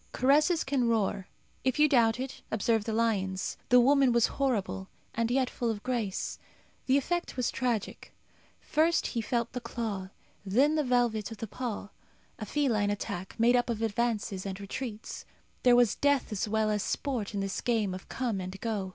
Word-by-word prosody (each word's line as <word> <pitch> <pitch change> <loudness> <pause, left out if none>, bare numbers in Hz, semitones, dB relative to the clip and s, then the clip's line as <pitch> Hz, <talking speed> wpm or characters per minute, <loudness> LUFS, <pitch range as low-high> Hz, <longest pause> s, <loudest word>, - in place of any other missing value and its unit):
Caresses 300 +6 +3
can 265 -3 +1
roar. 205 -4 0 0.4
If 260 -1 +1
you 300 0 +6
doubt 235 -5 +3
it, 260 0 -5
observe 220 0 +1
the 225 - -2
lion's. 200 -4 0
The 250 - +7
woman 270 +1 +5
was 235 -1 +4 0.2
horrible, 200 -7 -1 0.2
and 230 0 0
yet 260 +1 +2
full 240 -1 -2
of 210 -2 -3
grace. 235 -7 -2 0.5
The 265 +1 +5
effect 345 +2 -2
was 250 - 0
tragic. 240 -5 -2 0.5
First 325 +3 +2
he 235 - -1
felt 235 +1 -1
the 250 - -4
claw, 220 -5 -4 0.3
then 255 +10 +3
the 310 -1 +2
velvet 240 -5 +1
of 225 - -8
the 225 - -4
paw. 220 -2 -5 0.5
A 215 - -5
feline 225 -7 +1
attack, 190 -2 -4
made 240 +2 +5
up 245 0 +1
of 225 -1 -2
advances 220 -3 -1
and 195 -1 -5
retreats. 215 +2 -6 0.4
There 245 -1 +6
was 240 -4 +5
death 285 -4 +1
as 210 0 -1
well 215 0 +1
as 210 -1 0
sport 230 -6 -2
in - - -1
this 195 0 -2
game 220 -6 0
of 185 - -9
come 235 -7 -2
and 185 +1 -6
go. 210 -5 -2
230 Hz, 180 wpm, -29 LUFS, 205-255 Hz, 0.5 s, The